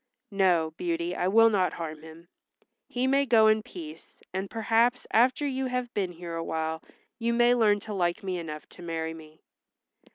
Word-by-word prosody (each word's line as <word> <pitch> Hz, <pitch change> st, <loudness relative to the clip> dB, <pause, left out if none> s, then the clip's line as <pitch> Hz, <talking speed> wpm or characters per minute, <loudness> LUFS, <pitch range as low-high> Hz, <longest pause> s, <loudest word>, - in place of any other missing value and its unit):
"No, 175 Hz, -5 st, +2 dB
Beauty, 170 Hz, 0 st, -2 dB
I 180 Hz, -, 0 dB
will 225 Hz, +3 st, +6 dB
not 185 Hz, -5 st, +1 dB
harm 155 Hz, -2 st, -6 dB
him. 160 Hz, +2 st, -13 dB, 0.6 s
He 250 Hz, +1 st, -1 dB
may 275 Hz, +1 st, +3 dB
go 230 Hz, -4 st, +5 dB
in 215 Hz, 0 st, +4 dB
peace, 165 Hz, -6 st, -11 dB
and 190 Hz, +1 st, -3 dB
perhaps 230 Hz, +2 st, +1 dB
after 255 Hz, +5 st, +3 dB
you 265 Hz, -1 st, -1 dB
have 250 Hz, -1 st, -3 dB
been 185 Hz, -3 st, -2 dB
here 170 Hz, 0 st, -8 dB
awhile 160 Hz, -1 st, -3 dB, 0.4 s
you 235 Hz, 0 st, 0 dB
may 240 Hz, +1 st, +4 dB
learn 215 Hz, -4 st, +3 dB
to 215 Hz, -, -6 dB
like 180 Hz, +2 st, -1 dB
me 185 Hz, -2 st, -2 dB
enough 155 Hz, -2 st, -7 dB
to -, -, -13 dB
marry 165 Hz, -1 st, -3 dB
me." 155 Hz, -1 st, -14 dB
190 Hz, 175 wpm, -27 LUFS, 165-230 Hz, 0.6 s, will